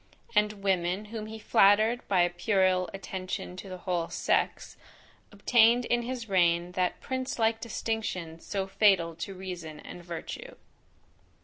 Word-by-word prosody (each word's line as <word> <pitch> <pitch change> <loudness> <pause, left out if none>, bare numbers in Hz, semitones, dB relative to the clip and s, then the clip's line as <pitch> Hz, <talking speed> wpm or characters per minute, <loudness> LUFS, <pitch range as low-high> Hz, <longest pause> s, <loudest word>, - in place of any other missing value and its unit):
And 210 -2 +1
women, 185 +1 0
whom 215 -1 -5
he 220 +1 -7
flattered 215 +3 +4
by 190 -3 +3
a 175 - +2
puerile 185 0 +2
attention 185 -1 -5
to 195 - -8
the 185 - -6
whole 175 -2 -2
sex, - - -1 0.6
obtained 235 +3 +4
in 240 0 +1
his 240 -1 -5
reign 175 -2 +2
that 180 0 -1
prince 260 0 -3
like 225 -1 +1
distinction 215 -8 -3
so 195 +2 -3
fatal 190 -4 +3
to 190 +3 -5
reason 175 -5 -7
and 175 - -10
virtue. 175 - -7
195 Hz, 140 wpm, -29 LUFS, 180-220 Hz, 0.6 s, flattered